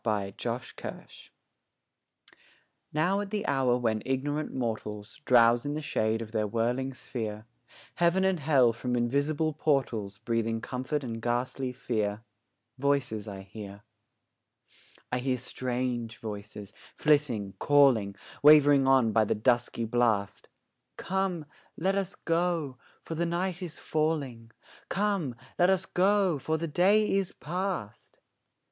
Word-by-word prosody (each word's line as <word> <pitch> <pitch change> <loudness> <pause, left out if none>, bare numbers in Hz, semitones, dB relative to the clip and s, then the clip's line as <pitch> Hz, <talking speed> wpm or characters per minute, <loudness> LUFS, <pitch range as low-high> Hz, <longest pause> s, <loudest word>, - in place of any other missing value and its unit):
TWILIGHT 100 -4 -2
VOICES 120 +1 -6 1.6
Now, 175 +6 +1
at 205 -1 -4
the 210 0 -2
hour 130 -3 +2
when 110 -3 0
ignorant 145 +3 -2
mortals 110 -4 -4
Drowse 120 -1 +5
in 145 +1 -3
the - - -2
shade 110 -4 0
of 110 - -11
their 110 -1 0
whirling 120 +5 -1
sphere, 110 -3 -5 0.5
Heaven 175 +2 +2
and 190 -2 +2
Hell 135 -5 +4
from 125 +2 -2
invisible 145 +6 0
portals 120 -10 0
Breathing 115 0 -1
comfort 130 +5 -3
and 115 -2 -5
ghastly 125 +2 -1
fear, 110 -3 -2 0.6
Voices 130 -6 0
I 100 -2 -7
hear; 100 +1 -10 1.3
I 125 - 0
hear 130 0 0
strange 125 -2 -3
voices, 105 -2 -8 0.2
flitting, 130 -10 +1
calling, 130 -9 +4 0.3
Wavering 145 -2 +7
by - - +3 0.3
on 110 - +1
the - - +1
dusky 120 +1 +1
blast, 110 -4 0 0.5
'Come, 190 -4 -2 0.3
let 190 +4 +1
us 195 -1 -2
go, 165 -6 -1 0.2
for - - -6
the 170 +2 -1
night 175 +1 -2
is 175 -4 -6
falling; 145 -7 -2 0.4
Come, 195 - 0 0.2
let 175 +1 +5
us 190 0 +2
go, 190 -4 +2
for 160 +3 -1
the 165 +1 -3
day 195 +7 +3
is 195 -2 0
past!' 175 - -5
130 Hz, 125 wpm, -29 LUFS, 115-160 Hz, 1.6 s, Wavering